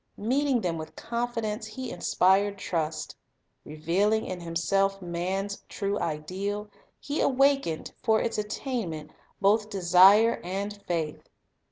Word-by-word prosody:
Meeting 260 +3 +1
them 170 -4 -2
with 155 0 -8
confidence, 230 -2 -3
He 245 +3 -6
inspired 195 +2 +2
trust. 160 -5 -3 0.5
Re 150 +1 -10
vealing 200 +7 +2
in 185 - -5
Himself 195 +4 0
man's 185 +3 -3
true 200 0 -2
ideal, 195 +7 -3 0.3
He 285 +1 -2
awakened, 270 - +2
for 220 -1 +3
its 230 - -1
attainment, 210 - -4 0.3
both 210 +2 +3
desire 195 +3 +5
and 200 +3 -4
faith. 160 -3 -3
200 Hz, 120 wpm, -27 LUFS, 175-220 Hz, 0.5 s, desire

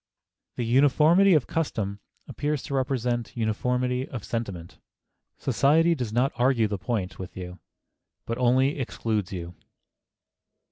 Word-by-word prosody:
The 120 - -2
uniformity 150 +9 +5
of 150 - +2
custom 105 -11 -2 0.3
appears 150 -1 -2
to - - -6
represent 125 -3 -1
uniformity 125 +3 -1
of 120 -6 -6
sentiment.... 100 -8 -5 0.6
Society 165 +5 +3
does 125 -8 -3
not 125 +4 +2
argue 120 -3 +3
the 100 -2 -4
point 105 -6 -3
with 95 0 -8
you, 90 0 -7 0.7
but 115 +1 -3
only 130 +4 +3
excludes 110 -6 -2
you." 90 -2 -6
125 Hz, 125 wpm, -26 LUFS, 110-135 Hz, 0.7 s, uniformity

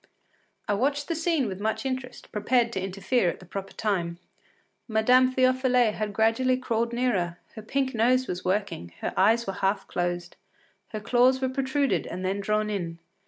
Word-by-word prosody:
” - - -42
I 205 - +1
watched 280 - 0
the 335 - 0
scene 325 -4 +1
with 190 -1 -5
much 220 +5 -2
interest, 255 -1 -5
prepared 235 +2 +1
to 190 - -2
interfere 195 +2 0
at - - -5
the 185 - -13
proper 195 +2 -6
time. 175 -6 -1 0.7
Madame 250 +3 +4
Théophile 255 -3 +3
had 215 -1 -3
gradually 225 +5 +2
crawled 235 -2 -1
nearer; 205 -9 0 0.2
her 220 - -8
pink 260 +4 -1
nose 250 +3 +3
was 180 -5 -4
working, 185 - -2
her - - -2
eyes 225 +4 +4
were 195 - -3
half 195 +1 0
closed, 175 0 -3 0.5
her 215 - -5
claws 250 +4 +3
were 260 -1 0
protruded 270 +1 0
and 185 +2 -5
then 195 +2 -1
drawn 210 +1 0
in. 170 -5 -3
220 Hz, 175 wpm, -26 LUFS, 195-255 Hz, 0.7 s, Madame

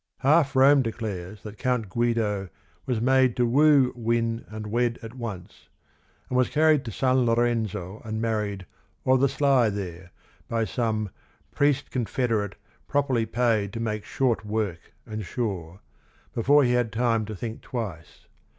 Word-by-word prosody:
Half 140 0 +3
Rome 135 +1 +6
declares 105 -5 -5
that 105 -1 -9
Count 125 -4 0
Guido 105 -2 0 0.4
was 125 -4 0
made 130 0 +3
to 125 - +3
"woo, 140 +1 +4
win, 115 -1 -1
and 110 0 -7
wed 120 +2 0
at 115 0 -8
once," 110 -8 -8 0.6
and 125 - -4
was 125 0 +3
carried 155 -2 +3
to 115 - -4
San 130 +1 +2
Lorenzo 115 -5 0
and 110 -1 -4
married 105 -4 -2 0.4
"o' 130 - +5
the 135 +1 +3
sly 135 -4 +3
there" 90 -3 -6 0.4
by 115 -1 0
some 110 -4 -1 0.4
"priest 145 -1 +1
confederate 115 -4 -1 0.3
properly 135 -5 +1
paid 110 -4 +1
to 115 - -4
make 110 -2 -2
short 125 -5 0
work 105 -5 -3
and 110 -1 -5
sure," 95 -5 -4 0.5
before 140 +5 +4
he 120 - +2
had 120 -2 +1
time 115 -1 +1
to 110 0 -6
think 110 +3 -6
twice. 100 - -6
115 Hz, 150 wpm, -26 LUFS, 105-125 Hz, 0.6 s, Rome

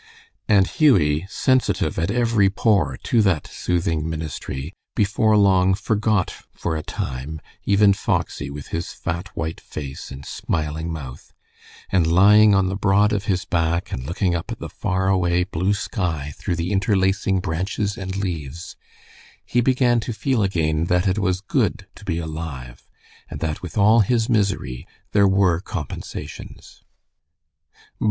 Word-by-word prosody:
And 100 -4 +5
Hughie, 95 - +3
sensitive 130 +1 +1
at 85 +3 0
every 115 -3 +3
pore 95 - +1
to 115 - +3
that 95 -8 +1
soothing 85 -3 -1
ministry, 80 -1 -5 0.2
before 110 +1 +3
long 95 -2 +4
forgot 105 0 0 0.2
for 80 - -2
a 80 - -2
time 70 +3 -5 0.3
even 100 0 +5
Foxy, 70 -7 -2
with 70 0 -8
his 85 +2 -4
fat, 85 +2 -4
white 80 -1 -3
face 70 -3 -7
and 70 +1 -9
smiling 80 +1 -3
mouth, 70 -6 -8 0.6
and 90 -4 +3
lying 105 +3 +6
on 95 -1 +3
the 95 +1 -1
broad 105 +1 +3
of 105 0 -1
his 95 -4 0
back, 85 0 0
and 65 - -4
looking 90 +5 -1
up 85 -1 -3
at - - -4
the - - -7
far 95 0 -1
away 90 -2 +2
blue 95 +2 0
sky 80 -8 -3
through 85 - -3
the 85 +3 -2
interlacing 95 -1 +1
branches 95 +4 -2
and 95 -1 -5
leaves, 85 -5 -5 0.7
he 120 - +1
began 125 -1 +3
to 115 +1 -4
feel 130 +1 0
again 80 -5 +1
that 90 +2 +1
it 95 +3 +1
was 95 -2 0
good 100 - 0
to - - -15
be 90 -5 -2
alive, 75 -7 -7 0.4
and - - -6
that 80 -2 -3
with 90 0 -7
all 110 +3 +6
his 115 +2 +2
misery 100 - -1 0.2
there 100 -1 +4
were 95 -3 +3
compensations. 75 -7 -7
95 Hz, 150 wpm, -22 LUFS, 80-100 Hz, 0.7 s, lying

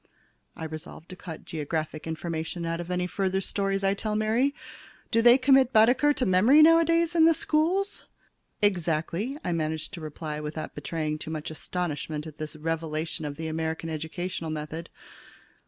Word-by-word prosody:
I - - -7
resolve 160 +1 -8
to 185 - -8
cut 165 -3 -9
geographic 155 0 -4
information 165 +1 -4
out 165 0 -2
of 175 0 -6
any 180 0 0
further 190 +1 0
stories 195 0 -1
I 195 0 +3
tell 210 +1 -3
Mary. 230 +7 +2 0.6
Do 230 -1 +4
they 240 +2 +8
commit 265 -1 +5
Baedeker 250 +5 +5
to 270 -3 -1
memory 220 +12 +6
nowadays 330 +1 +5
in 325 -2 +5
the 330 0 +6
schools? 340 +6 0 0.6
"Exactly," 175 - 0
I - - -1
manage 160 -1 -1
to 180 -5 -9
reply 155 0 -5
without 150 +1 -5
betraying 155 +1 -3
too 155 - -6
much 155 -1 -4
astonishment 155 -2 -3
at 155 -1 -10
this 155 0 -5
revelation 160 0 -3
of 145 -1 -4
the 160 +2 -6
American 160 +1 -3
educational 160 +2 -4
method. 155 +2 -5
170 Hz, 160 wpm, -27 LUFS, 155-220 Hz, 0.6 s, they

